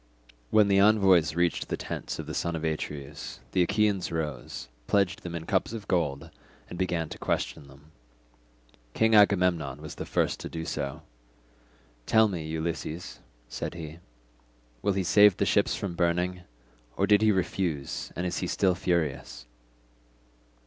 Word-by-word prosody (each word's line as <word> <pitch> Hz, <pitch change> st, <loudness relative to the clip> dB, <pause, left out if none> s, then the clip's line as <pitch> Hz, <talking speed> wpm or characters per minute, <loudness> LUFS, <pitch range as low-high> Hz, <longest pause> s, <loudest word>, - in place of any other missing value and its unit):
When 105 Hz, -2 st, +5 dB
the 100 Hz, -1 st, +4 dB
envoys 95 Hz, -7 st, +5 dB
reached 85 Hz, 0 st, +1 dB
the -, -, -1 dB
tents -, -, -5 dB
of -, -, -5 dB
the -, -, -6 dB
son 85 Hz, -1 st, -1 dB
of 80 Hz, -, -4 dB
Atreus, 75 Hz, -3 st, -4 dB
the 95 Hz, -, +2 dB
Achaeans 100 Hz, 0 st, +1 dB
rose, 75 Hz, -9 st, -4 dB, 0.2 s
pledged 95 Hz, -3 st, +1 dB
them 85 Hz, -1 st, -6 dB
in 80 Hz, -1 st, -5 dB
cups 95 Hz, +4 st, 0 dB
of 105 Hz, -4 st, -7 dB
gold, 80 Hz, -3 st, -1 dB, 0.4 s
and 90 Hz, -, -8 dB
began 85 Hz, -3 st, 0 dB
to -, -, -9 dB
question 70 Hz, -, -2 dB
them. 70 Hz, +3 st, -18 dB, 1.0 s
King 110 Hz, 0 st, +3 dB
Agamemnon 90 Hz, -9 st, +4 dB
was -, -, -8 dB
the -, -, -7 dB
first -, -, 0 dB
to -, -, -6 dB
do 80 Hz, 0 st, -5 dB
so. 70 Hz, -3 st, -4 dB, 1.0 s
"Tell 110 Hz, 0 st, +5 dB
me, 85 Hz, -6 st, -4 dB
Ulysses," 80 Hz, +1 st, -4 dB, 0.3 s
said -, -, -5 dB
he, 80 Hz, -1 st, -8 dB, 0.8 s
"will 100 Hz, -, +1 dB
he 95 Hz, 0 st, 0 dB
save 105 Hz, +2 st, +6 dB
the -, -, +1 dB
ships -, -, +2 dB
from 95 Hz, -3 st, -4 dB
burning, 90 Hz, +1 st, 0 dB, 0.6 s
or 100 Hz, -, +3 dB
did 105 Hz, +1 st, +4 dB
he 110 Hz, 0 st, +5 dB
refuse, 90 Hz, -6 st, -2 dB
and 90 Hz, -, -2 dB
is 90 Hz, -, -2 dB
he -, -, -2 dB
still 95 Hz, -2 st, +2 dB
furious?" 80 Hz, -9 st, -2 dB
85 Hz, 155 wpm, -28 LUFS, 80-100 Hz, 1.0 s, save